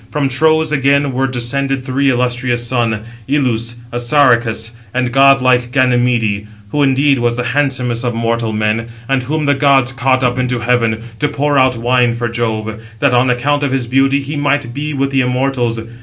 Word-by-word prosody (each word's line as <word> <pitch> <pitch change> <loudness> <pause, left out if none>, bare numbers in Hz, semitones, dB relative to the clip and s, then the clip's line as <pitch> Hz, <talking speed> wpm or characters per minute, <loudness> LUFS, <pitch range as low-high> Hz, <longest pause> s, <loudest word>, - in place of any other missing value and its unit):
From 145 -2 -1
Tros 155 +3 +2
again 140 -1 +1
were 135 +1 0
descended 135 +1 -2
three 135 +1 +1
illustrious 125 -1 -1
sons, 115 -3 -1 0.2
Ilus, 120 -5 0 0.2
Assaracus, 120 -3 +1 0.2
and 125 -1 0
godlike 130 -2 +3
Ganymede, 120 -5 +1 0.2
who 145 - 0
indeed 135 0 +2
was 120 0 0
the 125 - -1
handsomest 130 -4 0
of 120 -2 -2
mortal 115 0 -1
men; 110 +1 -1 0.2
and 135 -1 +1
whom 150 +4 -2
the 145 - +3
gods 135 -2 +2
caught 130 0 +1
up 125 0 0
into 125 -1 0
heaven, 115 -2 0 0.2
to 150 - +1
pour 145 -1 0
out 130 -2 +2
wine 120 0 +1
for 120 0 -2
Jove, 115 -2 -2
654 110 0 -7 0.2
that, 140 0 +2
on 125 +1 +3
account 145 +4 0
of 140 -2 -1
his 130 -2 -1
beauty, 135 +3 +2
he 140 +2 -6
might 145 -4 -1
be 150 +3 -4
with 135 -1 -1
the 135 -1 +2
immortals. 125 -2 -1
125 Hz, 180 wpm, -15 LUFS, 120-135 Hz, 0.2 s, godlike